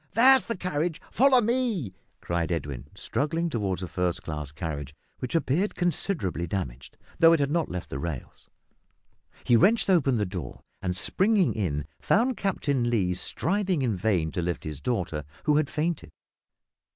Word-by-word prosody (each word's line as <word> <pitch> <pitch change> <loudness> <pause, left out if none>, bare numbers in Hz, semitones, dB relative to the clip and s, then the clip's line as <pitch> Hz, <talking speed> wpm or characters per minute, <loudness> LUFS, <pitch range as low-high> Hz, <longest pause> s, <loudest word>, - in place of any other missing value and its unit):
that's 260 +3 +6
the 230 - -2
carriage, 170 -2 -2
follow 260 0 +5
me," 230 - 0 0.3
cried 85 0 -1
Edwin, 70 -5 -3
struggling 165 +9 -1
towards 95 -6 -1
a - - -3
first 90 +1 -1
class 75 -2 -5
carriage, 75 -3 -5 0.2
which 125 +4 -3
appeared 165 +5 +1
considerably 165 - -1
damaged, 65 -9 -5 0.2
though 165 -1 +7
it 165 - +3
had 140 0 +1
not 170 0 0
left 90 -1 -6
the 65 - -3
rails. 75 -5 -6 0.9
He 120 - +4
wrenched 200 - +4
open 140 -8 +3
the 105 - +1
door, 90 -3 -6 0.2
and, 90 -1 -1
springing 190 - +3
in, 75 -9 -2 0.2
found 245 +4 +2
Captain 140 - 0
Lee 95 -6 +1
striving 185 - -1
in 115 -5 +1
vain 90 -5 0
to 90 - -2
lift 85 0 -2
his 75 -3 -6
daughter, 90 - -2 0.2
who 150 -1 +3
had 155 -1 +1
fainted. 155 +1 -2
120 Hz, 160 wpm, -27 LUFS, -, 0.9 s, though